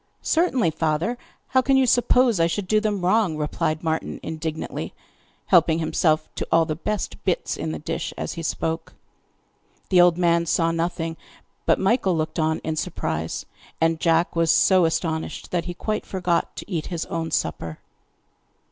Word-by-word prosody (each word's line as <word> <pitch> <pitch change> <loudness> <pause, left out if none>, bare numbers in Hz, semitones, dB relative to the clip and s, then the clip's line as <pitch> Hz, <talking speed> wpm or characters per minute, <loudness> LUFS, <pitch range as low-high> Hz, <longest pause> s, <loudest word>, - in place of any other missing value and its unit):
'Certainly, 265 - +2
father; 160 +7 0 0.3
how 260 - +4
can 270 +1 +3
you 265 - +4
suppose 245 -3 +3
I 165 - +4
should 185 +3 -3
do 215 +2 +3
them 205 -4 -1
wrong?' 190 -4 +2
replied 155 +1 -1
Martin 160 -1 -2
indignantly, 160 0 -4 0.5
helping 165 -3 +4
himself 155 -1 +1
to - - -4
all 165 0 +5
the 155 - -2
best 210 +5 -4
bits - - 0
in 80 - -3
the 80 - -4
dish 75 - -4
as - - -3
he 165 - -6
spoke. 165 0 -3 0.9
The 180 -2 +6
old 175 -1 +5
man 170 -1 +2
saw 165 0 +2
nothing, 165 -1 -2 0.5
but - - +4
Michael 195 -4 +2
looked 155 +2 -2
on 160 0 +1
in 160 -1 -2
surprise, 80 - -3 0.3
and 165 0 +2
Jack 165 +1 +2
was 165 -1 +2
so 185 +1 +5
astonished 160 0 -2
that 175 -2 -1
he 175 -1 -5
quite 215 +4 -3
forgot 180 -3 -1
to - - -8
eat 165 -4 -2
his 170 -3 -3
own 165 -1 -3
supper. 80 - -2
165 Hz, 165 wpm, -23 LUFS, 160-185 Hz, 0.9 s, The